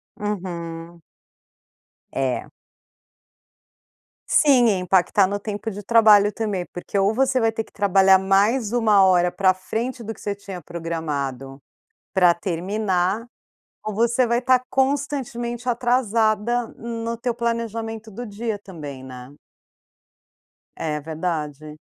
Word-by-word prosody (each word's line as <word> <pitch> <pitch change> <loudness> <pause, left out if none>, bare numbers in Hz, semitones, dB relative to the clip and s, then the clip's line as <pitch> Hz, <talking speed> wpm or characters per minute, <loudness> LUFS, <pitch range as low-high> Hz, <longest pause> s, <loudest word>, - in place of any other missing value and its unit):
Uhum. 170 -4 -5 1.1
É. 130 -2 -2 1.8
Sim, 265 -5 +5
e 205 - +2
impactar 185 +2 +3
no 200 +2 -2
tempo 210 +1 -5
de 205 +1 -7
trabalho 210 -1 +5
também, 205 -4 -2
porque 180 +3 -3
ou 200 +3 +2
você 260 +1 +2
vai 225 -2 +2
ter 225 0 -3
que - - -23
trabalhar 195 -2 +5
mais 205 +4 +2
1h 195 -6 +4
para 185 +1 +2
frente 235 +6 -4
do 225 +1 -5
que - - -17
você 205 -1 -3
tinha 195 -2 -9
programado 145 -6 -4 0.6
para 180 -3 +5
terminar, 185 +3 -1 0.6
ou 215 - -4
você 235 +3 +2
vai 235 0 +1
estar 255 0 +3
constantemente 265 -3 -1
atrasada 235 -1 +1
no 230 0 -4
teu 240 0 -2
planejamento 230 -1 -3
do 240 +4 -7
dia 215 +1 -4
também 150 -9 -9
né? 130 -1 -10 1.5
É 150 -1 -2
verdade, 155 -1 -4
205 Hz, 120 wpm, -22 LUFS, 175-230 Hz, 1.8 s, Sim